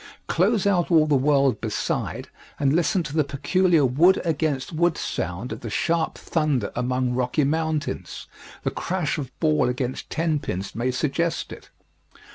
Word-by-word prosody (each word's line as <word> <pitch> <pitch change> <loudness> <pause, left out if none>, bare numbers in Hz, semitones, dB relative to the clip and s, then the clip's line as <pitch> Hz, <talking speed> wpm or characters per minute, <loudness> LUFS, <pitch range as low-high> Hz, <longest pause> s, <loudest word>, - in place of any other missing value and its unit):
Close 200 +4 +2
out 185 -4 +2
all 160 -3 +5
the 150 - +1
world 135 -2 +2
beside - - -2 0.3
and 140 -1 +2
listen 175 +2 +2
to 150 -2 -7
the 155 - +4
peculiar 150 +3 +2
wood 165 +9 +4
against 155 -2 -1
wood 170 +1 +2
sound 90 +8 -4
of - - -5
the 115 - -6
sharp 165 +9 0
thunder 150 -9 -1
among 125 0 0
rocky 125 +4 +1
mountains 155 0 -2 0.4
the - - 0
crash 170 -3 -2
of 135 -4 -5
ball 155 -6 +2
against 125 +1 -3
ten 160 -2 0
pins 95 -6 -4
may 120 +3 -1
suggest 155 +6 -1
it. - - -13
150 Hz, 155 wpm, -24 LUFS, 130-165 Hz, 0.4 s, all